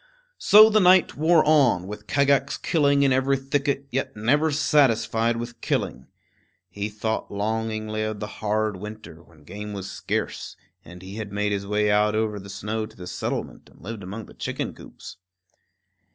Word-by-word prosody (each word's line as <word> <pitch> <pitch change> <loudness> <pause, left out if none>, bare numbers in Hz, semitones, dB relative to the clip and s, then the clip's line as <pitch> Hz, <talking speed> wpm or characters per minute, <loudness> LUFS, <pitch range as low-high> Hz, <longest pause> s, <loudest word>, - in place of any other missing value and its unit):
So 215 +2 +7
the 215 - +4
night 185 -1 +5
wore 160 +2 +4
on, 135 - +3
with 105 +2 -9
Kagax 140 -1 +2
killing 140 -3 +2
in 135 -2 +3
every 135 +1 +2
thicket, 140 +1 -1
yet 130 +2 -2
never 145 +9 +2
satisfied 115 -6 +2
with 120 0 -7
killing. 65 +1 -2 0.6
He 100 +1 -4
thought 110 +1 -3
longingly 110 +1 -2
of 110 -1 -3
the 105 - -3 0.2
hard 110 -1 0
winter, 105 -4 -10
when 80 -3 -21
game 105 +6 -7
was 95 -1 -6
scarce, - - -4 0.3
and 90 +2 -13
he 95 +3 -9
had 110 -2 -6
made 105 0 -1
his 100 -1 -3
way 105 0 +1
out 105 +1 +2
over 110 -1 -1
the 100 +1 -11
snow 105 +3 -4
to - - -19
the 90 - -9
settlement, - - -5
and - - -22
lived 110 +2 -6
among 100 +4 -7
the - - -15
chicken - - -4
coops. - - -12
110 Hz, 170 wpm, -24 LUFS, 105-135 Hz, 0.6 s, So